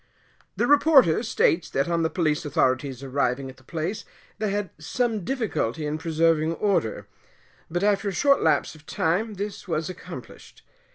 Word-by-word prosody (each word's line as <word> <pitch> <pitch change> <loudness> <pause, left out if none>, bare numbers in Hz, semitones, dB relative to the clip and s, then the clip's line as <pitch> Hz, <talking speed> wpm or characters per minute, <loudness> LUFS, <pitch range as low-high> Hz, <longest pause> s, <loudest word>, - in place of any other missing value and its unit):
The - - +1
reporter 285 - +5
states 190 -7 +1
that 135 +3 0
on 170 -1 0
the 160 - +1
police 155 -5 0
authorities 130 -2 0
arriving 135 -1 -1
at 130 - -20
the 130 - -20
place, 165 - -4 0.4
they 215 -1 0
had 200 -2 -2
some 225 +4 -1
difficulty 175 - -2
in 150 +1 -2
preserving 165 -1 +2
order; 185 - 0 0.6
but 175 +3 -2
after 205 0 +2
a - - -3
short 280 +9 +3
lapse - - +2
of 155 -1 -17
time 205 +7 0
this 200 +1 -6
was 160 0 -2
accomplished. - - -11
165 Hz, 160 wpm, -25 LUFS, 150-205 Hz, 0.6 s, reporter